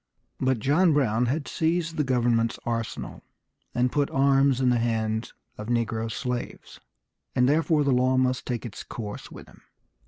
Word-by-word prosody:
But 130 -1 +1
John 155 - +3
Brown 125 -4 +2
had 140 +4 -2
seized 165 0 -1
the 150 - +1
government's 120 -3 +1
arsenal, 115 -1 -4 0.5
and 125 0 +2
put 145 -1 +1
arms 135 -1 +3
in 130 -1 +3
the 120 - +2
hands 110 -1 -1 0.3
of 105 - -6
negro 115 -1 -1
slaves, 125 +1 -5 0.6
and 125 0 +4
therefore 155 +1 +2
the 140 - +2
law 130 +1 +2
must 130 -1 0
take 120 -3 -3
its 115 - -7
course 105 -3 -7
with - - -11
him. - - -19
125 Hz, 160 wpm, -26 LUFS, 115-140 Hz, 0.6 s, and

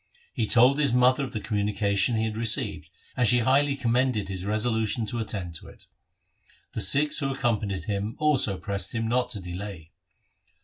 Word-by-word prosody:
He 115 -6 -1
told 125 +6 +4
his 140 -5 +2
mother 125 +3 +3
of 130 - -5
the 110 - -4
communica 105 -1 -1
tion 100 +4 +3
he 110 - 0
had 110 -1 -4
received, 115 0 0 0.3
and 125 - +2
she 125 - +5
highly 140 +4 +2
commended 120 -5 0
his 95 -1 -5
resolution 110 +1 0
to 115 +3 -4
attend 100 -6 -4
to - - -14
it. - - -14 0.9
The - - -1
Sikhs 150 +2 +4
who 135 -3 -1
ac 135 - -5
companied 105 -6 -1
him 105 +1 -3
also 135 -10 +1
pressed 100 +3 -3
him 115 0 -1
not 125 +1 0
to 115 -5 -3
delay. 90 -2 -8
115 Hz, 185 wpm, -26 LUFS, 100-125 Hz, 0.9 s, she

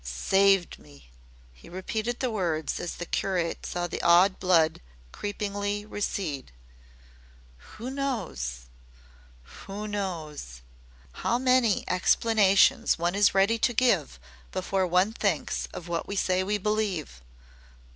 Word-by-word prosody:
"SAVED 190 - +2
ME!" 70 -4 -18 0.4
he - - -16
repeated 220 +6 -3
the 255 -2 0
words 170 -7 -1
as 175 - -4
the 175 - -6
curate 175 -2 -2
saw 175 0 -2
the - - -4
awed 175 +3 +5
blood 165 -4 +3 0.3
creepingly 205 - -3
recede. 185 - -4 1.3
"Who 240 +4 -5
knows, 185 - -3 1.0
who 205 +2 -5
knows! 160 - -5 0.5
How 235 - -1
many 255 -4 +2
explanations 215 +4 +3
one 170 +1 0
is 200 0 +3
ready 200 +4 +3
to 245 - +2
give 250 +1 +1 0.3
before 190 0 -1
one 180 +5 +2
thinks 200 -9 -1
of 175 - -8
what 170 -1 -3
we 200 - -4
say 185 -1 +1
we 205 +2 0
believe. 200 - -2
195 Hz, 120 wpm, -27 LUFS, 170-210 Hz, 1.3 s, awed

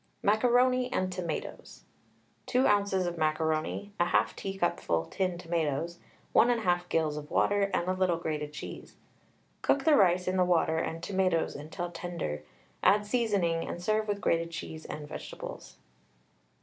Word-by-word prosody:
MACARONI 250 +4 +3
AND 185 0 -1
TOMATOES. 175 -4 -5 0.6
2 255 +1 +3
oz, 205 -1 +3
of 175 -2 -1
macaroni, 160 +5 0
1/2 175 0 +2
teacupful 175 - -1
tinned 180 - -2
tomatoes, 165 -1 -2 0.3
1 - - +6
1/2 180 -7 +1
gills 155 -2 +1
of 150 0 -7
water, 200 -1 +2
a 180 +2 0
little 185 -2 +1
grated 150 -3 -3
cheese. - - -8 0.7
Cook 280 - +2
the 310 0 +5
rice 180 -4 +4
in 185 +1 +1
the 185 - +5
water 165 -2 +2
and 165 0 -3
tomatoes 185 -4 +1
until 160 +4 -5
tender, 170 - -4 0.4
add 205 +3 +4
seasoning, 200 -8 +1
and - - -4
serve 215 +4 0
with 205 -1 -2
grated 165 -1 +1
cheese 160 -1 -7
and 150 -1 -6
vegetables. - - -8
175 Hz, 140 wpm, -30 LUFS, 165-200 Hz, 0.7 s, 1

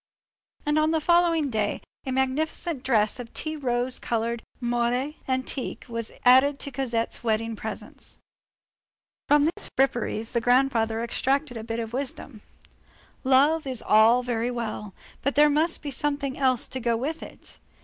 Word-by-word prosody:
And 295 +1 +2
on 310 0 +3
the 320 0 +2
following 335 -3 +3
day, 215 -2 -1 0.3
a - - -1
magnificent 265 +3 -1
dress 225 -3 +1
of 235 -2 -8
tea 310 0 -3
rose 250 -3 -1
colored 230 0 -2 0.2
moire 240 +3 0
antique 260 0 -3
was 230 -2 -4
added 260 +3 +6
to 280 - -5
Cosette's 240 -4 -2
wedding 225 0 0
presents. 220 +1 -8 1.1
From 290 0 +5
these 325 - 0
fripperies, 240 -4 0
the 235 - 0
grandfather 235 -3 +2
extracted 265 +3 0
a 225 - -5
bit 225 0 -4
of 225 0 -5
wisdom. 260 -3 -5 0.8
"Love 285 +4 +3
is 255 -3 -1
all 225 +4 +5
very 240 -1 -1
well; 220 -4 -4 0.3
but 280 - -1
there 295 +1 +6
must 320 +4 +1
be 290 - -4
something 285 0 -2
else 260 -4 +2
to 260 - -3
go 235 -2 0
with 300 +7 -3
it. - - -13
255 Hz, 150 wpm, -26 LUFS, 230-285 Hz, 1.1 s, added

